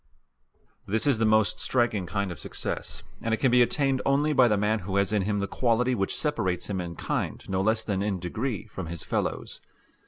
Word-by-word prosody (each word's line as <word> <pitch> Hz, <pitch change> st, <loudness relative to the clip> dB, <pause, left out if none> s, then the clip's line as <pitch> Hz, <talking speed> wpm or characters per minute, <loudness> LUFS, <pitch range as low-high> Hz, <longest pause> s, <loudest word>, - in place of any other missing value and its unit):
This 110 Hz, +6 st, +1 dB
is 135 Hz, -6 st, +3 dB
the 115 Hz, -, +3 dB
most 110 Hz, -1 st, +3 dB
striking 115 Hz, -7 st, +1 dB
kind 100 Hz, +1 st, -2 dB
of 85 Hz, -, -8 dB
success, -, -, -4 dB, 0.2 s
and 115 Hz, -1 st, +1 dB
it -, -, -12 dB
can 130 Hz, -, +3 dB
be 125 Hz, 0 st, +6 dB
attained 135 Hz, +1 st, +2 dB
only 145 Hz, +2 st, +2 dB
by 130 Hz, -3 st, +6 dB
the 105 Hz, -3 st, +2 dB
man 105 Hz, +2 st, +1 dB
who 95 Hz, 0 st, -4 dB
has 100 Hz, +1 st, +2 dB
in 105 Hz, -, +2 dB
him 105 Hz, +2 st, 0 dB
the 100 Hz, 0 st, -1 dB
quality 125 Hz, +2 st, +1 dB
which 95 Hz, -5 st, -1 dB
separates 105 Hz, -, -1 dB
him 95 Hz, -2 st, -1 dB
in 85 Hz, -1 st, -6 dB
kind -, -, -3 dB
no 95 Hz, 0 st, 0 dB
less 110 Hz, +2 st, +2 dB
than 100 Hz, -3 st, -1 dB
in 100 Hz, -1 st, 0 dB
degree 105 Hz, +6 st, -3 dB
from 95 Hz, -5 st, -7 dB
his 85 Hz, -1 st, -6 dB
fellows. -, -, -2 dB
105 Hz, 215 wpm, -27 LUFS, 95-120 Hz, 0.2 s, be